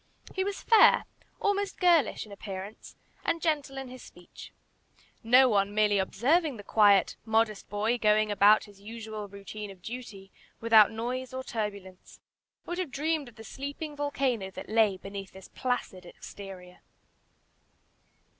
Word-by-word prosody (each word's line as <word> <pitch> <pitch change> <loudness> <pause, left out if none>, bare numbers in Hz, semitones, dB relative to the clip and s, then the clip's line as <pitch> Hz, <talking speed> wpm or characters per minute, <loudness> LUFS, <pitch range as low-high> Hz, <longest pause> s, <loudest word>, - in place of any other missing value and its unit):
He 380 - -1
was 400 0 -4
fair, 450 -3 +6 0.3
almost 405 -1 -1
girlish, 340 - +3
in 210 - -15
appearance, 200 +1 -8 0.3
and 335 - 0
gentle 295 -5 -1
in 270 -1 -5
his 255 0 -11
speech. 175 0 -13 0.7
No 250 +3 +6
one, 205 -3 +1
merely 210 -1 +3
observing 275 - +1
the 205 - -10
quiet, 200 -2 +4
modest 220 -2 0
boy, 215 +4 0
going 215 0 +3
about 205 +1 +5
his 205 -2 -16
usual 215 -1 -7
routine 200 +1 -8
of 185 -2 -14
duty, 215 -5 -8 0.3
without 225 -2 +6
noise 250 +3 -4
or 260 - -4
turbulence, 200 -6 -6 0.5
would 350 +1 -4
have 365 -5 -2
dreamed 295 0 -2
of 230 - -20
the 225 - -11
sleeping 285 +5 -7
volcano 270 -8 -1
that 190 - -10
lay 215 -3 +3
beneath 195 0 -8
this 190 -1 -13
placid 245 -8 -3
exterior. 180 -1 -11
220 Hz, 145 wpm, -28 LUFS, 200-265 Hz, 0.7 s, fair